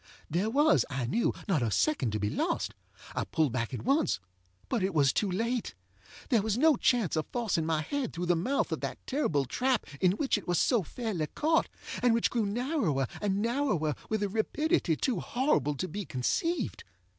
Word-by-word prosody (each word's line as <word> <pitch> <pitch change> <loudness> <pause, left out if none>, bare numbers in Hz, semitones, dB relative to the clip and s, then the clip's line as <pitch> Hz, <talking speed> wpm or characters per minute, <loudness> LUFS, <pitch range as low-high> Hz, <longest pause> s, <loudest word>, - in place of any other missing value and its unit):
There 185 +7 +1
was, 295 +6 +4
I 130 -3 -2
knew, 225 - +1 0.2
not 180 -9 +2
a 115 - +1
second 275 - +1
to 105 - -1
be 105 +1 -1
lost. - - -1 0.4
I - - -1
pulled 155 -5 0
back 115 -3 -1
at 125 - -4
onceŌĆöbut 90 - -2
it 190 -1 -1
was 140 -3 +4
too 205 - +1
late. 230 - -1 0.5
There 235 -5 +4
was 215 +1 0
no 310 +3 +5
chance 235 - +2
of 155 - -1
forcing 210 -10 0
my 160 -1 +1
head 280 - -2
through 175 +1 -3
the 175 0 +3
mouth 255 +12 0
of - - -2
that - - -3
terrible 165 - 0
trap 250 - 0 0.2
in 185 -1 +4
which 260 0 0
it - - -15
was 175 -1 +1
so 240 -5 +3
fairly 190 -3 -3
caught, 320 - +1 0.3
and 245 -2 +4
which 230 - +1
grew 225 -4 +1
narrower 215 - 0 0.2
and 205 0 0
narrower 230 - +1 0.2
with 220 -1 0
a - - +1
rapidity 225 - +1
too 235 - 0
horrible 245 - +1
to 185 - -3
be 205 +2 -4
conceived. 235 - -1
205 Hz, 190 wpm, -30 LUFS, 155-250 Hz, 0.5 s, no